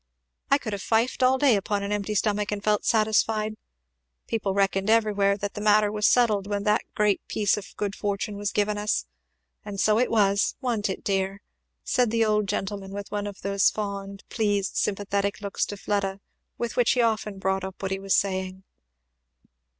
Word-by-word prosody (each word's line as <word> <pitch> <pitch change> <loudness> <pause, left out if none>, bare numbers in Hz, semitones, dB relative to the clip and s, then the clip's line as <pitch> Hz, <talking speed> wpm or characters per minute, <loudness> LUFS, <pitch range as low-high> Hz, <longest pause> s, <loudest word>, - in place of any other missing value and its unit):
I 275 - +5
could 220 -7 -5
have 200 - -4
fifed 230 +5 +1
all 255 +1 +4
day 265 -4 +4
upon 200 0 -1
an 200 - -3
empty 210 0 -2
stomach 210 0 0
and 205 -1 -3
felt 210 -1 +1
satisfied. 215 -1 +2 0.7
People 200 -4 -2
reckoned 195 0 +1
everywhere 205 -3 +3
that 205 0 -4
the 210 - -6
matter 210 0 +4
was 210 0 +2
settled 215 -5 +3
when 205 -1 -2
that 210 0 +2
great 210 -2 +2
piece 205 -2 +1
of 210 - -9
good 205 -1 -2
fortune 205 +1 -3
was 205 0 -2
given 210 0 0
us. 210 0 0 0.6
And 200 -2 -6
so 215 +2 +3
it 250 - +2
was! 200 -3 +2
wa'n't 230 -6 -1
it, 190 - -4
dear?" 195 0 -1 0.4
said 250 -2 +2
the 225 0 +2
old 210 -1 +1
gentleman, 195 0 -3
with 200 0 -6
one 205 0 -2
of 200 -2 -8
those 200 -1 +3
fond, 200 -1 -5
pleased, 205 -3 -1
sympathetic 200 0 -1
looks 200 -2 -2
to 205 - -6
Fleda 195 -1 -2 0.4
with 235 -1 -3
which 245 -1 +3
he 250 - +2
often 215 -3 -1
brought 190 0 -1
up 190 0 -7
what 195 -1 -3
he 195 - -1
was 195 0 +1
saying. 190 -1 -1
205 Hz, 190 wpm, -26 LUFS, 195-215 Hz, 0.7 s, I